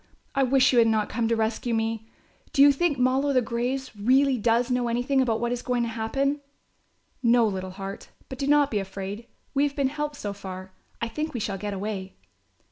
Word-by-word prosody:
I 275 Hz, -, +1 dB
wish 260 Hz, 0 st, +4 dB
you 245 Hz, -, +5 dB
had 230 Hz, -, +5 dB
not 220 Hz, -2 st, +1 dB
come 230 Hz, 0 st, 0 dB
to 230 Hz, -, +2 dB
rescue 225 Hz, +1 st, -1 dB
me. 225 Hz, 0 st, -2 dB, 0.4 s
Do 275 Hz, -, +6 dB
you 285 Hz, -, +8 dB
think 290 Hz, +1 st, +1 dB
'Moll 255 Hz, +3 st, +2 dB
o' 280 Hz, -, +1 dB
the 255 Hz, -, +4 dB
graves' 245 Hz, +3 st, -3 dB
really 260 Hz, +6 st, +3 dB
does 235 Hz, +2 st, +1 dB
know 250 Hz, -1 st, +1 dB
anything 245 Hz, +3 st, +1 dB
about 230 Hz, -3 st, +1 dB
what 240 Hz, +1 st, -1 dB
is 245 Hz, 0 st, -2 dB
going 245 Hz, -1 st, 0 dB
to 235 Hz, -, -2 dB
happen?" 270 Hz, +6 st, -1 dB, 0.8 s
"No, 235 Hz, -1 st, +4 dB
little 190 Hz, -3 st, -2 dB
heart, 195 Hz, +1 st, -7 dB, 0.2 s
but 260 Hz, -, -8 dB
do 275 Hz, -, -1 dB
not 290 Hz, -1 st, +4 dB
be 210 Hz, -, +1 dB
afraid, 195 Hz, +3 st, -6 dB, 0.3 s
we 280 Hz, -, +2 dB
have 285 Hz, -1 st, 0 dB
been 275 Hz, -2 st, +1 dB
helped 295 Hz, +1 st, -3 dB
so 205 Hz, -7 st, -4 dB
far. 190 Hz, -1 st, -8 dB, 0.3 s
I 230 Hz, -, 0 dB
think 305 Hz, +5 st, -4 dB
we -, -, -1 dB
shall 200 Hz, -2 st, -3 dB
get 205 Hz, 0 st, -3 dB
away." 195 Hz, -1 st, -5 dB
235 Hz, 215 wpm, -26 LUFS, 215-270 Hz, 0.8 s, you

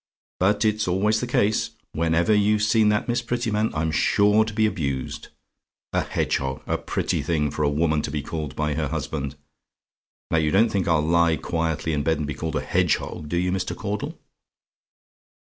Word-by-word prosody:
But 100 Hz, +4 st, +2 dB
it's 105 Hz, -1 st, +1 dB
always 105 Hz, +4 st, +2 dB
the -, -, -3 dB
case! 105 Hz, +2 st, +1 dB, 0.2 s
Whenever 85 Hz, +5 st, +2 dB
you've 105 Hz, +1 st, +3 dB
seen 110 Hz, 0 st, +4 dB
that 105 Hz, +3 st, +1 dB
Miss 120 Hz, 0 st, 0 dB
Prettyman, 115 Hz, -3 st, -1 dB
I'm 80 Hz, +1 st, 0 dB
sure 105 Hz, +6 st, +4 dB
to 110 Hz, -, -5 dB
be 110 Hz, +1 st, +2 dB
abused. 70 Hz, -11 st, -3 dB, 0.7 s
A -, -, +2 dB
hedgehog! 65 Hz, -1 st, -2 dB
A -, -, -1 dB
pretty -, -, -1 dB
thing 75 Hz, -4 st, 0 dB
for -, -, -4 dB
a 75 Hz, -, +3 dB
woman 75 Hz, +1 st, +1 dB
to 75 Hz, -, -4 dB
be 75 Hz, -1 st, -3 dB
called 75 Hz, -3 st, -5 dB
by 75 Hz, -1 st, -1 dB
her 75 Hz, 0 st, -1 dB
husband! 70 Hz, -1 st, -4 dB, 1.0 s
Now 80 Hz, -, +3 dB
you 75 Hz, -1 st, +1 dB
don't 110 Hz, +7 st, +4 dB
think 95 Hz, -3 st, 0 dB
I'll 80 Hz, -3 st, +2 dB
lie 85 Hz, 0 st, +3 dB
quietly 80 Hz, -1 st, -2 dB
in 75 Hz, -, 0 dB
bed, 80 Hz, +2 st, +1 dB
and 75 Hz, -, -2 dB
be 75 Hz, -, -3 dB
called 80 Hz, +2 st, -4 dB
a -, -, 0 dB
hedgehog 75 Hz, -, 0 dB
do 85 Hz, -, -1 dB
you, 90 Hz, +1 st, +1 dB
Mr. 95 Hz, -1 st, -2 dB
Caudle? 105 Hz, -1 st, -4 dB
85 Hz, 185 wpm, -24 LUFS, 75-105 Hz, 1.0 s, seen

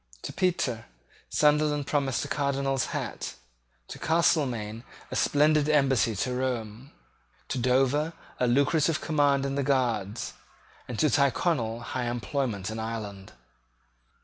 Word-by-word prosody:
To -, -, -5 dB
Petre 175 Hz, -, 0 dB, 0.4 s
Sunderland 150 Hz, -1 st, +2 dB
promised 140 Hz, -2 st, 0 dB
a -, -, -5 dB
Cardinal's 140 Hz, -2 st, 0 dB
hat; -, -, -4 dB, 0.5 s
to -, -, -9 dB
Castelmaine 125 Hz, -9 st, +1 dB, 0.3 s
a -, -, -3 dB
splendid 150 Hz, 0 st, +3 dB
embassy 135 Hz, -6 st, +3 dB
to 125 Hz, +6 st, -1 dB
Rome; 125 Hz, -1 st, -3 dB, 0.6 s
to 130 Hz, -, -1 dB
Dover 135 Hz, +6 st, +2 dB, 0.3 s
a 125 Hz, -, +2 dB
lucrative 145 Hz, +5 st, +2 dB
command 145 Hz, -3 st, +2 dB
in 135 Hz, -, -2 dB
the 140 Hz, -, 0 dB
Guards; 120 Hz, -6 st, 0 dB, 0.5 s
and 120 Hz, -, -5 dB
to -, -, +3 dB
Tyrconnel 135 Hz, -4 st, +1 dB
high 125 Hz, +1 st, -3 dB
employment 120 Hz, -4 st, -2 dB
in 110 Hz, -, -5 dB
Ireland. 105 Hz, -3 st, -6 dB
135 Hz, 120 wpm, -27 LUFS, 115-145 Hz, 0.6 s, splendid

